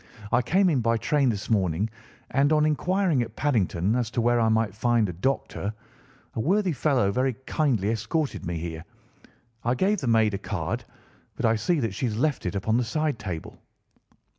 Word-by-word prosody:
I - - +4
came 185 +11 +3
in 140 - +2
by 115 0 +2
train 140 +2 +2
this 105 -3 -3
morning, 95 -2 +1 0.4
and 140 +2 +3
on 150 -1 +4
inquiring 175 0 +1
at 115 -1 -5
Paddington 105 - +1
as 120 -3 0
to 120 - -2
where 120 +1 +3
I 115 -1 +3
might 110 -3 +1
find 115 0 +2
a 90 - -4
doctor, 105 +1 -2 0.6
a - - -4
worthy 185 - +2
fellow 130 -8 +1
very 130 +4 +1
kindly 120 - +1
escorted 115 +7 -2
me 85 0 -3
here. 80 0 -5 0.8
I 120 +2 +1
gave 195 +7 +1
the 135 - -3
maid 110 -2 +3
a 100 - -2
card, - - -3 0.5
but - - -2
I 115 0 +4
see 165 +9 +1
that 115 -5 -1
she 125 +6 -1
has 110 -2 -3
left 140 -5 0
it 90 - -3
upon 110 +4 +1
the 125 - +2
side 150 +1 -1
table." 90 -6 -6
115 Hz, 190 wpm, -26 LUFS, 105-145 Hz, 0.8 s, I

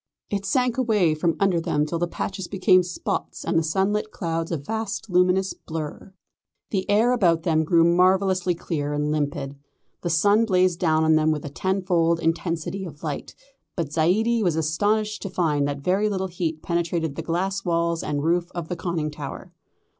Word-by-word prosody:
It 200 -1 -2
sank 250 +4 +1
away 210 -10 +3
from 160 +2 0
under 190 -4 +2
them 150 -3 0
till 165 +2 -3
the 175 - 0
patches 190 +1 -4
became 185 -1 +4
spots 180 -1 -4
and - - -1
the 165 - +4
sunlit 195 +6 0
clouds 165 -4 -3
a 165 - 0
vast, 220 +7 -4
luminous 180 +1 +3
blur. 160 +4 -7 0.6
The 190 -2 -2
air 220 +4 +4
about 175 -9 +2
them 160 -2 +2
grew 165 +1 +4
marvellously 185 +1 +3
clear 145 -3 -3
and 150 0 -1
limpid. 145 -2 -2 0.4
The 175 - -2
sun 205 +7 +4
blazed 185 -4 +2
down 160 -3 +2
on 160 0 +4
them 155 0 +2
with 150 -1 -3
a - - -4
tenfold 175 0 +1
intensity 165 +3 -2
of 150 -5 -9
light, - - -5 0.4
but 160 -5 -3
Zaidie 215 +9 +2
was 175 -6 +1
astonished 210 +7 0
to 195 - -4
find 150 -6 +1
that 140 -1 -4
very 195 +7 +1
little 190 -2 -2
heat 165 -3 -3
penetrated 170 -2 -1
the 165 - -4
glass 190 +4 -2
walls 170 -1 0
and 145 -1 -2
roof 170 +2 +1
of 170 -2 -5
the 180 - -2
conning 165 -3 -2
tower. 150 -2 -8
175 Hz, 180 wpm, -24 LUFS, 160-190 Hz, 0.6 s, became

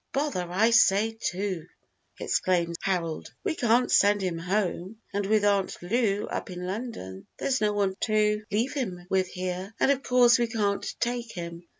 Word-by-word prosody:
"Bother 275 -11 -1
I 215 +6 +3
say 220 -2 +4
too," 190 -5 -3 0.5
exclaims 170 -2 0
Harold; 170 -5 -2
"we 390 -5 0
can't 245 -3 +2
send 205 0 +5
him 175 -3 -2
home, 190 +2 -2
and 200 0 -1
with 210 0 +3
Aunt 200 -2 +1
Lou 205 +1 +1
up - - -5
in 180 0 -6
London, 185 - -6
there's 260 -3 0
no 210 -1 +2
one 200 -2 +1
to 210 0 +1
leave 225 +5 0
him 190 -11 -4
with 190 -1 +2
here, 185 +3 -5
and 275 - +4
of 275 -1 0
course 245 -2 +5
we 235 - +2
can't 210 -3 -1 0.2
take 240 -1 -2
him. 170 -1 -7
205 Hz, 170 wpm, -27 LUFS, 180-230 Hz, 0.5 s, send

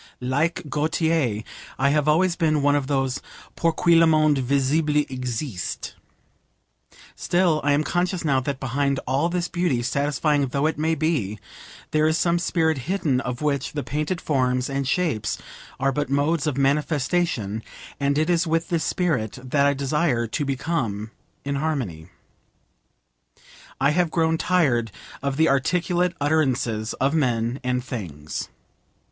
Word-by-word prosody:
Like 140 +7 0
Gautier, 150 -6 0 0.3
I 140 +1 +3
have 150 0 +1
always 170 +3 +3
been 155 -4 +1
one 145 0 +4
of 140 -2 0
those 135 -2 0 0.3
'pour 165 - +2
qui 170 +1 +3
le 165 0 +6
monde 155 -3 +4
visible 140 +4 +1
existe.' 125 - -4 1.2
Still, 175 -3 +1
I 145 0 +3
am 145 +2 +2
conscious 175 +1 -1
now 135 -3 +3
that 130 +1 -3
behind 140 +1 0
all 140 +6 +1
this 175 0 -1
beauty, 170 -9 0
satisfying 145 +2 +1
though 140 +3 -1
it 160 -1 0
may 160 +1 +1
be, 145 - -1 0.5
there 155 0 +3
is 160 +1 +2
some 170 0 +2
spirit 160 -4 +1
hidden 150 -10 +1
of 125 +2 -4
which 140 -3 -1
the 145 -2 -3
painted 155 +5 -2
forms 130 -2 0
and 135 -1 -1
shapes 130 - 0 0.4
are 135 +1 +2
but 145 0 -2
modes 145 +2 +1
of 140 -3 -1
manifestation, 140 - 0 0.4
and 140 0 +1
it 155 +1 +2
is 175 0 +2
with 165 +3 0
this 170 -3 0
spirit 150 - -1
that 140 +2 +2
I 140 - +2
desire 140 -3 0
to 115 +6 -2
become 130 -7 -2 0.3
in 140 0 -1
harmony. 125 - -3 1.7
I 140 +2 +3
have 175 +2 +2
grown 160 0 +1
tired 130 - +2 0.3
of 140 -1 -2
the 160 +1 +4
articulate 175 +6 +1
utterances 130 -7 0
of 135 +2 0
men 125 -4 0
and 125 0 0
things. 80 - -6
145 Hz, 150 wpm, -24 LUFS, 130-160 Hz, 1.7 s, le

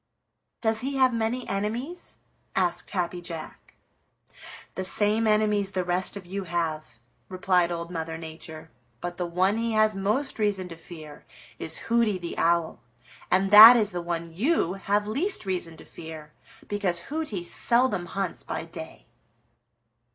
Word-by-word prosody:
"Does 220 -1 +1
he 275 +2 -3
have 260 -2 +4
many 230 +2 -2
enemies?" 235 - -4 0.4
asked 175 -2 0
Happy 180 -2 -2
Jack. 165 -2 -9 1.0
"The 190 - -3
same 210 +4 +1
enemies 210 -2 +2
the 185 - 0
rest 180 +3 0
of 190 - -10
you 195 +2 -5
have," 160 -7 -3 0.3
replied 180 -1 +1
Old 170 0 -4
Mother 160 -1 -4
Nature. 160 -2 -10 0.3
"But 175 +3 -5
the 180 - -2
one 185 +5 +1
he 230 0 -1
has 215 -1 +3
most 215 +8 -1
reason 200 -3 0
to 165 - -8
fear 160 -3 -11 0.4
is 160 0 0
Hooty 230 -4 +2
the 175 -2 -6
Owl, 170 -1 +1 0.5
and 195 +1 +2
that 220 +4 +12
is 215 -2 +1
the 175 -1 -3
one 170 -1 -4
you 220 - +1
have 200 +1 0
least 280 - 0
reason 175 -4 -3
to - - -13
fear, 155 -2 -10 0.3
because 185 -4 -1
Hooty 305 - -3
seldom 235 0 +1
hunts 195 +1 -4
by - - -4
day." 160 -1 -10
185 Hz, 150 wpm, -26 LUFS, 170-215 Hz, 1.0 s, that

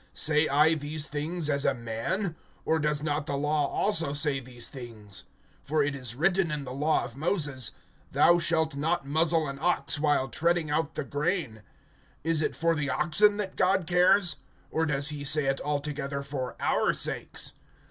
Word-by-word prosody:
(8)Say 155 0 +3
I 150 +3 +4
these 150 0 -2
things 155 +3 -2
as 140 -2 0
a 135 - +2
man? 120 - -3 0.3
Or 160 - +2
does 150 -1 0
not 150 -1 -2
the 140 - -1
law 150 0 +1
also 165 -7 +1
say 145 -2 +2
these 125 -2 -5
things? 110 -7 -8 0.4
(9)For 150 0 +2
it 145 - -1
is 125 -4 -3
written 175 +4 +2
in 150 -2 -3
the 125 -1 -7
law 150 +4 +1
of 115 - -8
Moses: 145 - -1 0.4
Thou 175 0 +5
shalt 160 -3 +1
not 155 +1 -1
muzzle 160 +2 +2
an 140 0 -6
ox 150 -3 +1
while 145 -3 +2
treading 160 +4 0
out 160 +1 -1
the - - -2
grain. 145 - -2 0.6
Is 165 0 +1
it - - -1
for 165 0 +1
the 150 -3 -2
oxen 170 +9 +3
that 195 -3 -3
God 190 -1 +2
cares? 180 -1 +3 0.4
(10)Or 160 0 +1
does 140 -1 0
he 150 -1 -3
say 145 +1 +3
it 135 0 0
altogether 145 -1 -3
for 135 -3 -5
our - - +1
sakes? - - -2
150 Hz, 180 wpm, -28 LUFS, 140-165 Hz, 0.6 s, Thou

